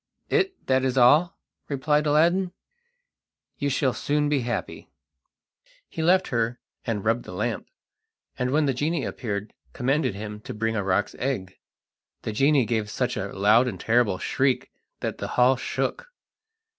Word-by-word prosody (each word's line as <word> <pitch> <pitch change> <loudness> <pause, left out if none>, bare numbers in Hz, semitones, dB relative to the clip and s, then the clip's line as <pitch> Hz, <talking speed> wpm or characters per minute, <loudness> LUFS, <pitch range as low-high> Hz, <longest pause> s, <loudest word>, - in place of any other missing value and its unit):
"It 380 0 0
that 130 0 +2
is 130 0 0
all," 150 +8 +5 0.3
replied 150 +2 +1
Aladdin, 175 +5 +3 1.1
"you 140 - 0
shall 130 -1 +1
soon 145 0 0
be 145 -2 +2
happy." 120 -1 -4 1.0
He 160 - -5
left 185 +3 +3
her 115 0 0 0.3
and 110 -3 -2
rubbed 115 +2 +1
the - - -9
lamp, - - -2 0.7
and 125 -1 -1
when 150 +3 +2
the 135 - +1
genie 150 +3 -1
appeared 105 -3 -4 0.2
commanded 135 -3 0
him 105 +1 -6
to 105 - -8
bring 115 +1 -1
a 105 - 0
roc's 95 +1 0
egg. 110 -9 -3 0.6
The - - -2
genie 135 +2 +3
gave 110 -1 -1
such 125 +3 -1
a 100 - -3
loud 105 +6 +4
and 100 -7 -4
terrible 115 -4 +2
shriek 130 +7 0 0.3
that - - -3
the - - -3
hall 125 +2 +5
shook. - - -3
125 Hz, 155 wpm, -25 LUFS, 110-150 Hz, 1.1 s, all